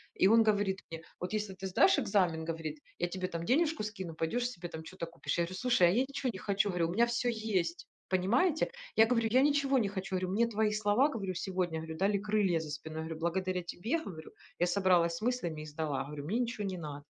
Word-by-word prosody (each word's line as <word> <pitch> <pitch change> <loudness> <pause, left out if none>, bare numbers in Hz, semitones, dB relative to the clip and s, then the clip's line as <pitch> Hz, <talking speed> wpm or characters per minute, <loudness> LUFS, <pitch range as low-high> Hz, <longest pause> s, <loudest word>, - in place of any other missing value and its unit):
И 190 - +4
он 225 +3 +6
говорит 205 -3 +1
мне: 165 0 -6 0.2
"Вот 180 +3 -4
если 210 -2 -2
ты 190 +1 -5
сдашь 285 - +4
экзамен,- 185 -9 +1
говорит, 160 -2 -4 0.2
я 175 - +1
тебе 185 0 -3
там 170 0 -4
денежку 300 - +2
скину, 190 -6 -5
пойдешь 240 +10 -1
себе 175 -7 -7
там 160 -1 -7
чё-то 170 +1 -6
купишь". 165 +1 -4
Я - - +3
говорю: 185 +2 -7
"Слушай, 245 -8 +4
а - - +3
я 230 +7 +3
ничего 275 -1 -2
не 190 - -7
хочу,- 200 +1 +1
говорю, 175 -3 +1
у - - -3
меня 235 +4 +4
все 235 +1 0
есть". 195 -7 -2 0.2
Понимаете? 255 - +2 0.2
Я 220 - +7
говорю: 230 -1 +2
"Я 255 +3 +5
ничего 280 -2 +3
не 215 - +1
хочу,- 190 -1 -4
говорю,- 185 0 -1
мне 230 +4 +3
твои 220 -1 +1
слова,- 215 +6 +3
говорю,- 200 -9 -3
сегодня,- 180 -2 -2
говорю,- 160 0 -6
дали 200 +2 +2
крылья 205 -4 +1
за 160 -2 -6
спиной,- 155 +2 -6
говорю.- 160 0 -5
Благодаря 180 +2 -1
тебе,- 220 - -2
говорю,- 160 -4 -8 0.3
я 175 - +3
собралась 180 -3 +3
с - - -9
мыслями 215 -10 -1
и - - -7
сдала,- 150 -2 -2
говорю,- 145 0 -7
мне 210 +10 0
ничего 235 -4 -2
не 190 -1 -3
надо". 145 -3 -7
190 Hz, 230 wpm, -32 LUFS, 170-220 Hz, 0.3 s, Я